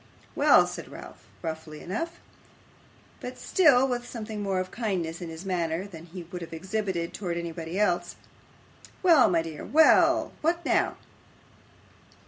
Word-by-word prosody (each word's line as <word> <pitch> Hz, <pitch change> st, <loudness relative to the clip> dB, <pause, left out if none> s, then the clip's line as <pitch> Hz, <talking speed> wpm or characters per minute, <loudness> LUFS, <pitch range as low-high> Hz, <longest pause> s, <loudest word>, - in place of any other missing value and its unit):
'Well,' -, -, +6 dB
said -, -, -7 dB
Ralph, -, -, -11 dB, 0.2 s
roughly 160 Hz, -2 st, -5 dB
enough; 280 Hz, -, -4 dB, 1.0 s
but -, -, -7 dB
still 275 Hz, -8 st, +4 dB
with 245 Hz, -1 st, -3 dB
something 220 Hz, -2 st, -5 dB
more 195 Hz, -2 st, 0 dB
of 185 Hz, 0 st, -4 dB
kindness 180 Hz, -8 st, -2 dB
in 170 Hz, -, -5 dB
his 165 Hz, +3 st, -8 dB
manner 175 Hz, -1 st, -1 dB
than 170 Hz, -5 st, -10 dB
he 175 Hz, +1 st, -8 dB
would 175 Hz, +1 st, -8 dB
have 165 Hz, -, -8 dB
exhibited 190 Hz, -1 st, -3 dB
towards 175 Hz, -4 st, -3 dB
anybody 170 Hz, +1 st, -4 dB
else. 175 Hz, -4 st, +1 dB, 0.9 s
'Well, 330 Hz, -8 st, +6 dB
my 165 Hz, -2 st, +2 dB
dear. 160 Hz, -2 st, -7 dB
What 320 Hz, +2 st, +3 dB
now? -, -, +1 dB
185 Hz, 135 wpm, -27 LUFS, 165-220 Hz, 1.0 s, Well